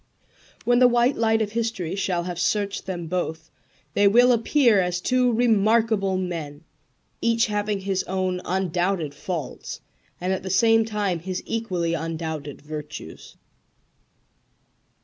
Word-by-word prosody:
When 245 0 +4
the 250 - +7
white 240 +2 +3
light 225 -1 +2
of 210 - -5
history 225 -7 -2
shall 185 -3 -1
have 175 -1 -5
searched 200 +3 -1
them 175 -3 -4
both 160 -2 -3 0.4
they 205 +4 +4
will 245 +5 +6
appear 235 -1 +4
as 180 0 -1
two 250 +4 +2
remarkable 220 -3 +2
men, 165 -5 -5 0.6
each 230 0 +3
having 210 -1 -1
his 190 -1 -1
own 185 -1 -1
undoubted 180 -3 -1
faults 155 -1 -5 0.4
and 185 +2 -1
at 190 - -2
the 190 - -6
same 225 +4 +4
time 205 -5 -1
his 185 +2 -5
equally 185 -7 -2
undoubted 160 -3 -4
virtues. 150 - -8
190 Hz, 130 wpm, -24 LUFS, 170-225 Hz, 0.6 s, the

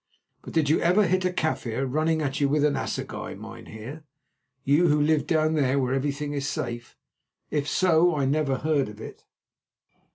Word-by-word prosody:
But - - -10
did 160 -3 +2
you 155 - +3
ever 185 +5 +4
hit 185 +1 +1
a - - +3
Kaffir 135 -7 -2
running 155 +4 0
at 140 0 -2
you 140 - +3
with 150 +1 +2
an 150 - +2
assegai, - - -4
mynheer, 125 +9 -9 0.6
you 150 +6 +3
who 150 -1 +3
live 150 0 +2
down 155 -1 +2
there 140 -3 +1
where 130 -1 0
everything 145 +2 -2
is 140 -1 -2
safe? 120 0 -5 0.5
If 145 -1 -1
so, 175 +1 +3
I 140 -2 0
never 140 0 +1
heard 145 -3 0
of 105 0 -12
it." - - -10
150 Hz, 175 wpm, -26 LUFS, 135-160 Hz, 0.6 s, ever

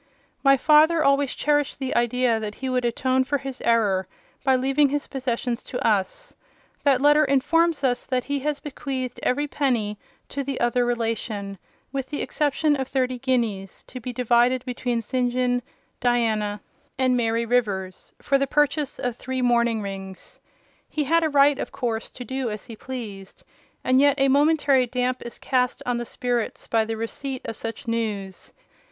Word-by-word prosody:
My 275 -1 +6
father 310 +3 +5
always 275 -1 +2
cherished 290 -1 +1
the 265 -2 -3
idea 240 -1 +2
that 210 -1 -5
he 265 - -4
would 250 -1 0
atone 260 +2 +1
for 285 +2 0
his 270 -1 -7
error 205 -5 +2 0.4
by 265 -1 +4
leaving 270 +3 +3
his 290 +1 -1
possessions 250 -2 -2
to 250 - -2
us; 210 - -1 0.5
that 275 -3 +3
letter 295 +1 +5
informs 305 +3 +2
us 250 -2 0
that 255 -2 0
he 285 0 -2
has 290 +1 -2
bequeathed 260 -3 -5
every 290 +4 +1
penny 235 -8 -1 0.3
to 280 - -3
the 275 -1 -4
other 240 +1 +2
relation, 220 -4 -2 0.3
with 270 -2 -4
the 290 - -3
exception 300 0 +1
of 265 -1 -3
thirty 255 -2 -1
guineas, 230 -7 -1
to 255 - -9
be 250 +1 -5
divided 245 +1 +2
between 245 -2 -2
St. 250 +1 0
John, 245 0 +1 0.4
Diana, 220 -4 +1 0.4
and 255 -1 +2
Mary 230 -1 +1
Rivers, 200 -6 -1
for 275 -1 +2
the 275 - +1
purchase 295 0 +1
of 245 -2 -2
three 260 +1 -3
mourning 235 -2 +2
rings. 195 -1 -8 0.5
He 305 - -1
had 330 +4 +2
a 315 - +2
right, 285 -1 +4
of - - -4
course, 235 -4 -3
to 250 - -9
do 260 -1 -2
as 210 -1 -6
he 230 - -9
pleased: 215 -6 -8 0.4
and 255 0 +3
yet 285 0 +4
a 270 0 +4
momentary 285 -2 +3
damp 250 +1 -1
is 235 - -8
cast 250 -2 0
on 245 -1 0
the 240 - -4
spirits 240 -1 -2
by 225 -1 +1
the 225 0 -4
receipt 260 +4 -5
of 225 - -4
such 225 +2 -6
news. 210 -5 -3
250 Hz, 170 wpm, -24 LUFS, 230-275 Hz, 0.5 s, My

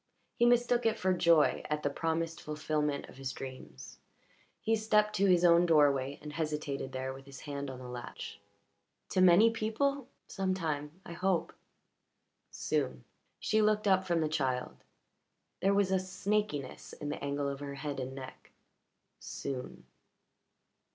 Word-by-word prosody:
He 240 - +3
mistook 240 0 +3
it 225 0 +1
for 185 0 +2
joy 170 -3 +4
at 150 0 -1
the 145 - +2
promised 165 +1 -2
fulfilment 150 -1 -2
of - - -14
his 135 -1 -4
dreams. 130 - -9 0.6
He 225 - +1
stepped 210 -1 +2
to 200 +1 +4
his 180 -1 +5
own 170 0 +6
doorway 145 -4 +3
and 150 -1 -7
hesitated 150 -3 -3
there 130 0 -3
with 135 +1 -12
his 135 -1 -10
hand 140 -2 -5
on 130 - -7
the 125 0 -9
latch. 125 -1 -7 0.7
"To 185 - +2
many 185 +5 +7
people? 240 +5 -1 0.2
Some 190 -1 -1
time, 155 -2 -3
I 170 - -7
hope." 180 -1 0 1.0
"Soon." - - -2 0.4
She 220 - +2
looked 215 0 +2
up 190 -1 +4
from 170 -2 +2
the 155 - +1
child; 130 -5 -1 0.8
there 195 +1 +3
was 200 -2 +2
a 190 - +4
snakiness 190 -6 -2
in 145 - -4
the 145 - -5
angle 140 0 -1
of 140 -1 -3
her 140 -1 -6
head 145 0 -4
and 130 +1 -5
neck. 130 -1 -10 0.7
"Soon." 130 -2 -6
160 Hz, 155 wpm, -32 LUFS, 140-195 Hz, 1.0 s, many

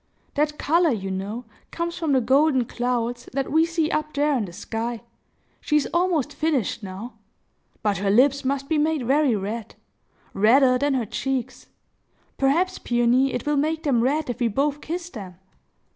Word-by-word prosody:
"That 300 +1 0
color, 335 +3 +3
you 195 -7 -2
know, 205 +6 -4 0.2
comes 340 0 -3
from 320 -4 -1
the 260 - +4
golden 265 +1 +3
clouds, 240 0 -2
that 270 0 -2
we 320 +2 +4
see 330 -2 0
up 305 -1 -2
there 290 0 +2
in 230 -5 0
the 180 - -9
sky. 225 +5 -4 0.6
She 300 - +1
is 295 - 0
almost 345 -5 +1
finished 295 -10 -1
now. 200 +5 -8 0.6
But 205 -2 +1
her 200 0 0
lips 270 +6 +4
must 275 +1 -1
be 315 0 +1
made 305 -3 0
very 275 -1 +3
red,—redder 230 +4 0
than 285 0 +1
her 245 -3 0
cheeks. 265 +3 -3 0.7
Perhaps, 340 +8 +2
Peony, 240 +3 +2
it 245 - -4
will 295 0 +1
make 315 +3 0
them 260 -6 +2
red 290 +5 +1
if 245 0 -4
we 240 - +2
both 285 +6 0
kiss 345 +1 -5
them!" 190 -6 -8
270 Hz, 170 wpm, -24 LUFS, 235-300 Hz, 0.7 s, the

